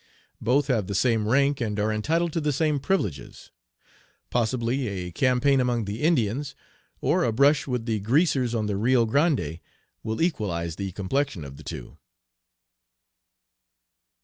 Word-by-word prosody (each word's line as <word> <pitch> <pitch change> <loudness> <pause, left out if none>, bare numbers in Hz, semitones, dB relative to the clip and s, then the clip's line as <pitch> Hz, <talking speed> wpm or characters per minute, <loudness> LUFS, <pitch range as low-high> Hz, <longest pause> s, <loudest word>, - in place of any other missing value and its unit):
Both 135 +4 +2
have 115 -9 0
the 100 - -3
same 115 0 +2
rank 140 +3 +2
and 105 -3 -2
are 110 +1 +1
entitled 160 +10 0
to 165 - -1
the 150 0 +1
same 150 +1 +1
privileges. 120 - -3 0.8
Possibly 120 +2 0
a 90 -3 -4
campaign 130 - +2
among 120 -3 0
the 100 +3 -5
Indians, 140 -3 0 0.5
or - - +2
a 120 - +1
brush 140 +6 +3
with 125 -3 -2
the 110 -2 -1
'Greasers' 130 - +1
on 110 -2 0
the 105 -2 -1
Rio 120 +2 +3
Grande, 130 - +1 0.4
will 110 0 -4
equalize 90 - -1
the 100 -1 -4
complexion 100 - -2
of 70 0 -10
the 75 - -12
two." - - -8
120 Hz, 150 wpm, -25 LUFS, 105-140 Hz, 0.8 s, brush